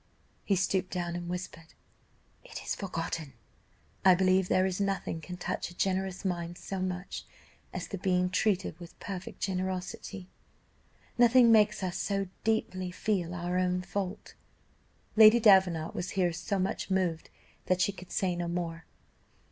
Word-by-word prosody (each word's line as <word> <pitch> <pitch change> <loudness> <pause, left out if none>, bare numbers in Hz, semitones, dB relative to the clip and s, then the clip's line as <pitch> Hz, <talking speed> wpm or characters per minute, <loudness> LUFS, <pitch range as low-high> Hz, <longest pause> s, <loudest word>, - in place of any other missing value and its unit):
He 200 - +2
stooped 190 0 0
down 175 -1 -3
and 175 0 -5
whispered, 175 -2 -7 0.7
'It - - -8
is - - -1
forgotten.' 165 -6 -4 0.7
"I 185 -1 +7
believe 185 0 +3
there 185 - +3
is 190 +1 -1
nothing 195 -4 -1
can 180 +3 -7
touch 180 - -3
a 175 - -14
generous 190 0 -1
mind 175 -2 -2
so 195 - -5
much 185 0 -4 0.5
as - - -5
the 195 - -5
being 180 -1 +1
treated 190 -4 0
with 175 -1 -12
perfect 190 -2 -7
generosity 185 0 -3 0.9
nothing 240 0 +7
makes 210 -2 +4
us 180 -2 -2
so 195 -2 -1
deeply 185 -4 0
feel 180 -2 -1
our 175 +1 -1
own 180 0 0
fault." 195 0 -4 0.8
Lady 220 +1 +9
Davenant 190 -7 +5
was 175 - -3
here 175 -2 +2
so 170 +4 -2
much 190 +1 -2
moved 185 -4 0 0.4
that 185 0 +2
she 185 - +3
could 180 -2 -12
say 185 -2 0
no 175 0 -2
more. 170 -1 -3
185 Hz, 150 wpm, -30 LUFS, 175-195 Hz, 0.9 s, Lady